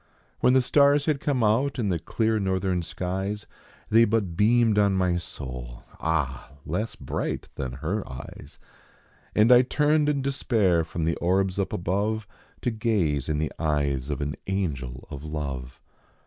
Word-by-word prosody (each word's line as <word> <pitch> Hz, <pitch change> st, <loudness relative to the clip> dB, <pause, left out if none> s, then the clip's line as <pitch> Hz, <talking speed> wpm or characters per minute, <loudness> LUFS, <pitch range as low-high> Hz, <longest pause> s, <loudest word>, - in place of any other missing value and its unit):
When 125 Hz, -, +4 dB
the 130 Hz, -1 st, +4 dB
stars 140 Hz, +2 st, +4 dB
had 150 Hz, -3 st, +1 dB
come 135 Hz, -5 st, 0 dB
out 125 Hz, +7 st, +2 dB
in 110 Hz, -5 st, 0 dB
the 85 Hz, -3 st, 0 dB
clear 110 Hz, +6 st, 0 dB
northern 95 Hz, -2 st, 0 dB
skies 95 Hz, +5 st, -3 dB, 0.5 s
They 115 Hz, +2 st, +7 dB
but 105 Hz, -6 st, 0 dB
beamed 110 Hz, +1 st, +4 dB
on 100 Hz, -1 st, +4 dB
my 90 Hz, -2 st, +2 dB
soul, 60 Hz, -6 st, -8 dB, 0.2 s
ah! 70 Hz, -5 st, -2 dB
less 105 Hz, +8 st, -2 dB
bright -, -, -4 dB
than 65 Hz, -2 st, -4 dB
her 85 Hz, +10 st, -2 dB
eyes, 65 Hz, 0 st, -10 dB, 0.8 s
And 110 Hz, +3 st, +5 dB
I 125 Hz, 0 st, +9 dB
turned 150 Hz, +3 st, +2 dB
in 140 Hz, -2 st, 0 dB
despair 110 Hz, -10 st, +2 dB
from 80 Hz, 0 st, -3 dB
the 80 Hz, -, 0 dB
orbs 95 Hz, +2 st, +1 dB
up 100 Hz, -, -1 dB
above 105 Hz, +5 st, -1 dB, 0.4 s
To 120 Hz, -, 0 dB
gaze 100 Hz, -, 0 dB
in 75 Hz, -, 0 dB
the 75 Hz, +1 st, -1 dB
eyes 70 Hz, -4 st, 0 dB
of 70 Hz, -2 st, -2 dB
an 70 Hz, 0 st, -2 dB
angel 70 Hz, -11 st, -3 dB
of 70 Hz, 0 st, -7 dB
love. 70 Hz, -5 st, -5 dB
95 Hz, 160 wpm, -26 LUFS, 75-115 Hz, 0.8 s, I